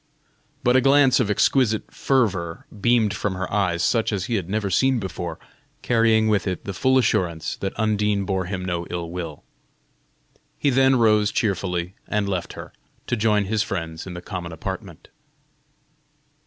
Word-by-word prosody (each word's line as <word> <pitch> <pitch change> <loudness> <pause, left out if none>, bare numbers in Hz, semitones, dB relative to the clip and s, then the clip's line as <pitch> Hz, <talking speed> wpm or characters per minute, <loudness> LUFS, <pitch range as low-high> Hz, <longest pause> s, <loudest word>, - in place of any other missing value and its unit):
But 125 +1 +3
a 130 - +5
glance 135 -1 +5
of 105 - +1
exquisite 110 +1 +1
fervor 95 -11 0 0.2
beamed 115 -3 +3
from 100 -2 -2
her 95 +1 -3
eyes 90 -4 +1
such 115 +5 +1
as 100 -4 -2
he 120 - -3
had 95 -6 -2
never 105 -1 -1
seen 130 +3 +3
before, 90 -5 -5 0.5
carrying 115 -2 +3
with 105 -2 +1
it 90 -1 -3
the 100 - -4
full 130 +7 +2
assurance 90 -9 0
that 95 - -4
Undine 105 -2 +1
bore 95 -2 -1
him 90 0 -4
no 85 -2 -3
ill 85 -1 -4
will. 85 -4 -6 1.1
He 140 - +1
then 130 +1 +4
rose 105 -3 +3
cheerfully 90 -4 -1
and 105 -2 -1
left 90 -3 -3
her, - - -10 0.3
to - - -1
join 105 -1 +2
his 105 +2 0
friends 80 -3 -4
in 90 - -7
the 90 - -8
common 90 -4 -6
apartment. 80 - -7
100 Hz, 165 wpm, -23 LUFS, 90-115 Hz, 1.1 s, a